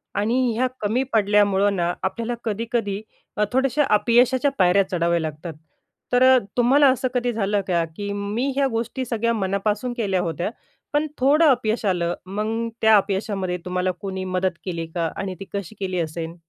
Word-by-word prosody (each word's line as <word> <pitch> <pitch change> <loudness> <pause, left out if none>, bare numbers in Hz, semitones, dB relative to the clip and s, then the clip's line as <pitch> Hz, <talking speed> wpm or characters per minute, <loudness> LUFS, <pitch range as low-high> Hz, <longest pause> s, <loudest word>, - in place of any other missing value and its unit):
आणि 210 +4 +1 0.2
ह्या 255 +3 +2
कमी 220 +5 +1
पडल्यामुळं 205 -2 +3
ना, 175 -1 0
आपल्याला 230 +5 -2
कधी-कधी 220 -2 -2 0.4
अ, 210 - +2
थोडेसे 265 +2 +2
अपयशाच्या 245 +5 +3
पायऱ्या 185 +2 +5
चढाव्या 170 -2 +1
लागतात. 160 +1 -5 0.6
तर 245 +1 +4
अ, - - +6 0.2
तुम्हाला 270 +4 +5
असं 260 0 +1
कधी 245 -1 0
झालं 205 -2 0
का? 170 -3 +2
की 205 +1 -4
मी 205 +6 -2
ह्या 275 0 +2
गोष्टी 240 +3 -2
सगळ्या 230 -1 0
मनापासून 210 +3 -1
केल्या 195 -5 0
होत्या, 170 +2 -2 0.4
पण 295 +1 +1
थोडं 290 +5 +4
अपयश 230 -3 0
आलं. 175 -3 +1
मग 215 +4 -2
त्या 220 0 +6
अपयशामध्ये 195 -2 -1
तुम्हाला 180 0 0
कोणी 190 -1 -4
मदत 185 -1 0
केली 170 -3 -3
का? 165 -2 0
आणि 190 -1 -4
ती 195 - -7
कशी 200 +1 -5
केली 185 -2 -2
असेल? 165 0 -4
205 Hz, 165 wpm, -23 LUFS, 185-235 Hz, 0.6 s, अ